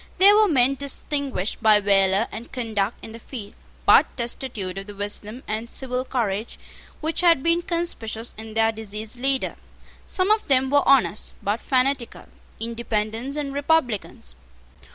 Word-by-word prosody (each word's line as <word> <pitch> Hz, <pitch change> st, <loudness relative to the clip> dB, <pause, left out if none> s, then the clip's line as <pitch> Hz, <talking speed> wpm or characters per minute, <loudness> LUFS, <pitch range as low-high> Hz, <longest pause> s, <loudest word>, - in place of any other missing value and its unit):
They 390 Hz, +2 st, +8 dB
were 425 Hz, 0 st, +5 dB
men 270 Hz, -5 st, +3 dB
distinguished 275 Hz, -6 st, -3 dB
by 215 Hz, -2 st, +6 dB
valour 195 Hz, +1 st, +3 dB
and 225 Hz, +3 st, -8 dB
conduct 220 Hz, -4 st, -2 dB
in 225 Hz, -, -9 dB
the 230 Hz, -, -9 dB
field, 220 Hz, -4 st, -9 dB, 0.3 s
but -, -, +5 dB
destitute 235 Hz, -6 st, -3 dB
of 195 Hz, -, -9 dB
the 205 Hz, -, -9 dB
wisdom 205 Hz, +4 st, -5 dB
and 220 Hz, +2 st, -3 dB
civil 255 Hz, -1 st, -3 dB
courage 220 Hz, -4 st, -2 dB, 0.4 s
which 320 Hz, +3 st, 0 dB
had 335 Hz, -6 st, +4 dB
been 335 Hz, +1 st, +2 dB
conspicuous 335 Hz, -, -3 dB
in 220 Hz, 0 st, -9 dB
their 225 Hz, 0 st, +3 dB
deceased 220 Hz, +1 st, -7 dB
leader. 270 Hz, +1 st, -1 dB, 0.5 s
Some 375 Hz, +2 st, +1 dB
of 430 Hz, 0 st, +2 dB
them 265 Hz, -1 st, +3 dB
were 285 Hz, 0 st, +5 dB
honest, 265 Hz, -6 st, +3 dB
but 205 Hz, +3 st, -1 dB
fanatical, 260 Hz, -2 st, 0 dB, 0.3 s
Independents 230 Hz, +3 st, -3 dB
and 285 Hz, -2 st, -3 dB
Republicans. 280 Hz, -, -1 dB
235 Hz, 150 wpm, -24 LUFS, 215-275 Hz, 0.5 s, They